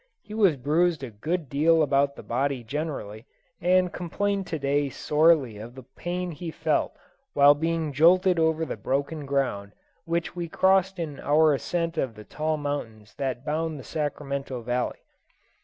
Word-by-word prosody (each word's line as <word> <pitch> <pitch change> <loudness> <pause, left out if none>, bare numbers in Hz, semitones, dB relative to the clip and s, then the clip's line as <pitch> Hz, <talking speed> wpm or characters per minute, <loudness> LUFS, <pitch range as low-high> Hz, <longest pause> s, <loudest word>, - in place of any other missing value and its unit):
He 210 - -11
was 200 -8 +4
bruised 155 +3 +1
a 125 - -5
good 155 +10 -3
deal 155 +4 +3
about 140 0 +2
the - - -10
body 135 +1 -1
generally, 120 -5 -5 0.3
and 180 0 +3
complained 195 +2 -2
to 160 - -2
day 140 0 0
sorely 150 -5 +2
of 115 +3 -9
the 130 - -10
pain 175 +8 -4
he 165 +2 -6
felt 160 -1 0 0.4
while 145 +1 +7
being 160 0 -1
jolted 175 +4 +5
over 160 0 +2
the 135 - -5
broken 140 +7 -2
ground 125 -8 -1 0.3
which 170 +1 -2
we 170 -2 -4
crossed 190 +2 +3
in 155 -5 -5
our 155 +1 +4
ascent 165 +3 -2
of 120 -4 -2
the 105 - -10
tall 155 +5 -2
mountains 115 -8 -5
that 130 -2 -3
bound 155 0 -2
the - - -9
Sacramento 140 -4 -4
Valley. 125 +1 -2
150 Hz, 160 wpm, -26 LUFS, 135-165 Hz, 0.4 s, while